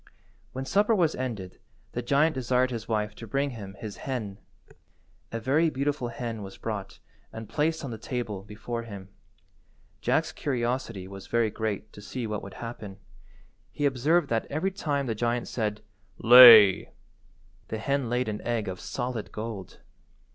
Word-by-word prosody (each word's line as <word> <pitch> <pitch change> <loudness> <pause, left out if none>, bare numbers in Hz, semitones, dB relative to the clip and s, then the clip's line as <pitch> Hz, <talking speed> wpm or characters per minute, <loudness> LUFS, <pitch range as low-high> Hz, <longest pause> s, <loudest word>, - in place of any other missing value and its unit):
When 130 +1 -5
supper 210 +8 +3
was 170 -5 +2
ended 110 -8 -5 0.3
the 120 - -3
giant 140 +6 +3
desired 130 -1 +1
his 115 -3 -5
wife 105 -2 -1
to 115 +2 -10
bring 140 +5 0
him 100 -5 -8
his 105 0 -7
hen. 110 -7 -4 0.9
A 115 - -3
very 145 +8 +2
beautiful 140 -2 -1
hen 115 -2 -5
was 95 -1 -9
brought 100 -3 -5 0.3
and 110 -1 -8
placed 155 +3 -1
on 130 - -5
the 110 - -6
table 110 -5 -4
before 110 +4 -6
him. 100 -4 -9 0.9
Jack's - - +1
curiosity 120 -7 -2
was 95 0 -10
very 115 -2 +1
great 110 -1 -4
to 105 - -11
see 120 +4 -5
what 105 -1 -3
would 100 - -10
happen. 110 -4 -7 0.7
He 145 - -2
observed 145 +5 +2
that 115 -1 0
every 160 +7 -1
time 145 -8 -2
the 115 - -1
giant 120 +2 -1
said 105 -3 -3 0.3
"Lay," 115 -5 +9 0.8
the 110 - -4
hen 135 +2 -1
laid 125 +1 0
an 105 -1 -3
egg 115 -3 -2
of 95 -1 -5
solid 120 -3 -4
gold. 105 -4 -7
115 Hz, 160 wpm, -27 LUFS, 105-130 Hz, 0.9 s, Lay